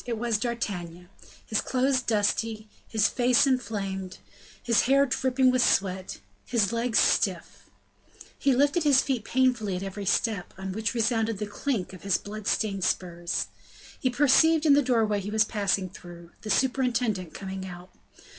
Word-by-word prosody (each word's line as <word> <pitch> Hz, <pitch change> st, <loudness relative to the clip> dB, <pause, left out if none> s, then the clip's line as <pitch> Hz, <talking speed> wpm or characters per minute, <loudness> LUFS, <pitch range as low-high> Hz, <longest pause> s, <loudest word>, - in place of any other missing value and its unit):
It 235 Hz, -2 st, -2 dB
was 230 Hz, -1 st, -1 dB
D'Artagnan, 180 Hz, -7 st, -4 dB, 0.4 s
his 220 Hz, -, 0 dB
clothes 260 Hz, +1 st, +1 dB
dusty, 220 Hz, 0 st, -1 dB, 0.2 s
his 220 Hz, -2 st, +2 dB
face 250 Hz, +2 st, +3 dB
inflamed, 195 Hz, -8 st, -2 dB, 0.5 s
his 235 Hz, -2 st, +3 dB
hair 275 Hz, +1 st, +4 dB
dripping 260 Hz, 0 st, +2 dB
with 255 Hz, 0 st, +2 dB
sweat, 190 Hz, -4 st, 0 dB, 0.2 s
his 230 Hz, -3 st, 0 dB
legs 230 Hz, 0 st, 0 dB
stiff; -, -, 0 dB, 0.7 s
he 275 Hz, -2 st, +2 dB
lifted 285 Hz, +6 st, +2 dB
his 280 Hz, -3 st, +5 dB
feet 255 Hz, -6 st, -2 dB
painfully 240 Hz, -6 st, +1 dB
at 180 Hz, -, -4 dB
every 195 Hz, 0 st, -6 dB
step, 210 Hz, -3 st, -1 dB
on 190 Hz, 0 st, -5 dB
which 220 Hz, +4 st, -2 dB
resounded 225 Hz, -1 st, 0 dB
the 210 Hz, -, -3 dB
clink 205 Hz, -2 st, -3 dB
of 185 Hz, -, -11 dB
his 195 Hz, -3 st, +1 dB
blood 210 Hz, 0 st, -8 dB
stained 200 Hz, -3 st, 0 dB
spurs. 175 Hz, -1 st, -1 dB, 0.5 s
He 255 Hz, -, +1 dB
perceived 300 Hz, +5 st, +4 dB
in 295 Hz, -, +6 dB
the 285 Hz, -, +5 dB
doorway 225 Hz, -5 st, +1 dB
he 200 Hz, -, -6 dB
was 215 Hz, +1 st, +3 dB
passing 200 Hz, -3 st, -1 dB
through, 175 Hz, -2 st, -13 dB
the 215 Hz, -, -7 dB
superintendent 235 Hz, -, 0 dB
coming 190 Hz, -1 st, -6 dB
out. 180 Hz, 0 st, -11 dB
220 Hz, 155 wpm, -26 LUFS, 195-255 Hz, 0.7 s, in